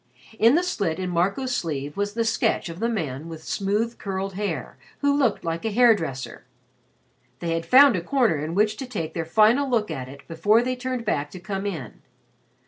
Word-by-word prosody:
In 230 Hz, +5 st, +6 dB
the 350 Hz, -, +3 dB
slit 200 Hz, -, -1 dB
in 185 Hz, -1 st, -3 dB
Marco's 200 Hz, +9 st, 0 dB
sleeve 145 Hz, -, -3 dB
was 205 Hz, 0 st, -2 dB
the 230 Hz, -1 st, 0 dB
sketch 225 Hz, -4 st, 0 dB
of 165 Hz, +1 st, -8 dB
the 230 Hz, +2 st, 0 dB
man 160 Hz, -, -3 dB
with 160 Hz, -1 st, -9 dB
smooth 210 Hz, +6 st, -1 dB
curled 195 Hz, 0 st, -3 dB
hair, 205 Hz, +2 st, -4 dB, 0.2 s
who 285 Hz, -1 st, +3 dB
looked 265 Hz, -7 st, +1 dB
like 165 Hz, 0 st, -2 dB
a 225 Hz, -, 0 dB
hair 235 Hz, +2 st, +6 dB
dresser. 135 Hz, -, -5 dB, 0.9 s
They 170 Hz, -1 st, -3 dB
had 165 Hz, 0 st, -3 dB
found 270 Hz, -2 st, +7 dB
a 175 Hz, -, -1 dB
corner 205 Hz, -, +1 dB
in 160 Hz, +2 st, -4 dB
which 215 Hz, +1 st, +2 dB
to 265 Hz, -, -6 dB
take 165 Hz, -10 st, -4 dB
their 165 Hz, -1 st, -3 dB
final 220 Hz, -, +4 dB
look 220 Hz, -7 st, 0 dB
at 130 Hz, -4 st, -5 dB
it 140 Hz, +1 st, -13 dB
before 205 Hz, +8 st, +3 dB
they 255 Hz, +1 st, -1 dB
turned 250 Hz, -1 st, -4 dB
back 145 Hz, -9 st, -1 dB
to 185 Hz, -, -10 dB
come 195 Hz, +2 st, -4 dB
in. 155 Hz, -, -6 dB
200 Hz, 205 wpm, -24 LUFS, 165-235 Hz, 0.9 s, found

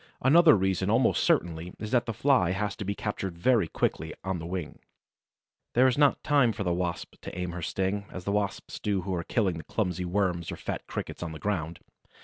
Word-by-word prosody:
Another 155 Hz, +4 st, +7 dB
reason 95 Hz, 0 st, 0 dB
almost 115 Hz, +3 st, +3 dB
certainly 85 Hz, +1 st, 0 dB
is 105 Hz, 0 st, -6 dB
that 120 Hz, -1 st, +2 dB
the -, -, 0 dB
Fly 115 Hz, -6 st, +3 dB
has 105 Hz, +2 st, -2 dB
to -, -, -4 dB
be 100 Hz, +1 st, -2 dB
captured 95 Hz, -5 st, -4 dB
very 110 Hz, -1 st, +3 dB
quickly, 80 Hz, 0 st, -2 dB
on 95 Hz, -2 st, -2 dB
the 80 Hz, -, -6 dB
wing. 90 Hz, -4 st, -5 dB, 1.0 s
There 125 Hz, +2 st, +6 dB
is 130 Hz, -2 st, +4 dB
not 145 Hz, -1 st, +3 dB
time 140 Hz, -6 st, +3 dB
for 100 Hz, -, -3 dB
the 90 Hz, -2 st, +1 dB
Wasp 90 Hz, -1 st, -3 dB
to -, -, -8 dB
aim 90 Hz, -1 st, -2 dB
her 85 Hz, 0 st, -6 dB
sting, 95 Hz, +4 st, -1 dB
as 90 Hz, -, -7 dB
the 100 Hz, -, -1 dB
Wasps 100 Hz, -2 st, -2 dB
do 100 Hz, -3 st, 0 dB
who 95 Hz, +1 st, -3 dB
are 85 Hz, -1 st, -2 dB
killing 95 Hz, -6 st, 0 dB
clumsy 90 Hz, -4 st, -1 dB
Worms 90 Hz, -2 st, 0 dB
or -, -, -4 dB
fat -, -, -5 dB
Crickets -, -, -5 dB
on 85 Hz, -2 st, -4 dB
the 80 Hz, -, -8 dB
ground. 85 Hz, -5 st, -2 dB
95 Hz, 210 wpm, -28 LUFS, 85-110 Hz, 1.0 s, Another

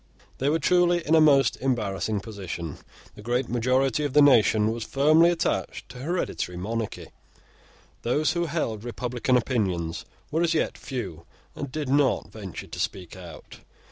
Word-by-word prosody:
They 135 Hz, -, +1 dB
were 155 Hz, -, +2 dB
truly 175 Hz, +1 st, +2 dB
in 155 Hz, -, +1 dB
a 160 Hz, -, +6 dB
most 140 Hz, -5 st, +4 dB
embarrassing 110 Hz, -5 st, -1 dB
position. 95 Hz, -7 st, -6 dB, 0.3 s
The -, -, -12 dB
great 120 Hz, +3 st, -1 dB
majority 130 Hz, +5 st, +1 dB
of 145 Hz, -3 st, -2 dB
the 150 Hz, -, +6 dB
nation 110 Hz, -5 st, +5 dB
was 115 Hz, 0 st, -4 dB
firmly 155 Hz, +7 st, +4 dB
attached 175 Hz, -1 st, -2 dB
to 125 Hz, -, -10 dB
hereditary 140 Hz, -, -3 dB
monarchy. 110 Hz, +4 st, -4 dB, 0.9 s
Those 150 Hz, +6 st, +1 dB
who 170 Hz, 0 st, -1 dB
held 115 Hz, -9 st, -2 dB
republican 125 Hz, +1 st, 0 dB
opinions 95 Hz, -10 st, -1 dB, 0.3 s
were 160 Hz, +2 st, +1 dB
as 170 Hz, -1 st, +2 dB
yet -, -, 0 dB
few, 95 Hz, -, -6 dB, 0.3 s
and 140 Hz, -, -6 dB
did 150 Hz, 0 st, -3 dB
not 135 Hz, -1 st, +2 dB
venture 100 Hz, -5 st, -8 dB
to -, -, -9 dB
speak 90 Hz, -2 st, -4 dB
out. 85 Hz, -4 st, -11 dB
125 Hz, 155 wpm, -26 LUFS, 105-150 Hz, 0.9 s, a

